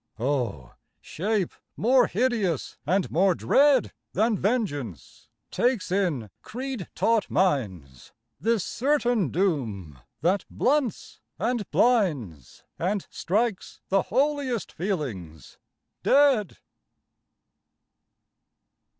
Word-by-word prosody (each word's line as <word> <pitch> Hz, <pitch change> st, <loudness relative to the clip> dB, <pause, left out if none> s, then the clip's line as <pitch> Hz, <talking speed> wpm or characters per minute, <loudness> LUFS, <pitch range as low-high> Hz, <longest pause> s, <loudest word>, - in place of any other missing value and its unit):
O! 120 Hz, -, -2 dB, 0.3 s
shape 200 Hz, +1 st, -2 dB, 0.2 s
more 250 Hz, +4 st, +4 dB
hideous 210 Hz, -, 0 dB
and 185 Hz, +3 st, +1 dB
more 185 Hz, +2 st, +3 dB
dread 275 Hz, -, +3 dB, 0.2 s
Than 220 Hz, +3 st, +2 dB
Vengeance 175 Hz, -, -3 dB, 0.2 s
takes 245 Hz, -7 st, 0 dB
in 165 Hz, -, 0 dB
creed 255 Hz, -4 st, -6 dB
taught 225 Hz, -3 st, +1 dB
minds, 95 Hz, -, -1 dB, 0.3 s
This 225 Hz, -3 st, +1 dB
certain 245 Hz, -, +1 dB
doom 115 Hz, -, -2 dB, 0.2 s
that 185 Hz, +5 st, +2 dB
blunts 270 Hz, -4 st, -1 dB, 0.2 s
and 230 Hz, -1 st, -1 dB
blinds, 145 Hz, -, 0 dB, 0.2 s
And 195 Hz, +3 st, -1 dB
strikes 210 Hz, +2 st, -2 dB
the 195 Hz, 0 st, +3 dB
holiest 275 Hz, -, -1 dB
feelings 115 Hz, -, -5 dB, 0.4 s
dead. 270 Hz, -8 st, +3 dB
195 Hz, 85 wpm, -26 LUFS, 145-240 Hz, 0.4 s, more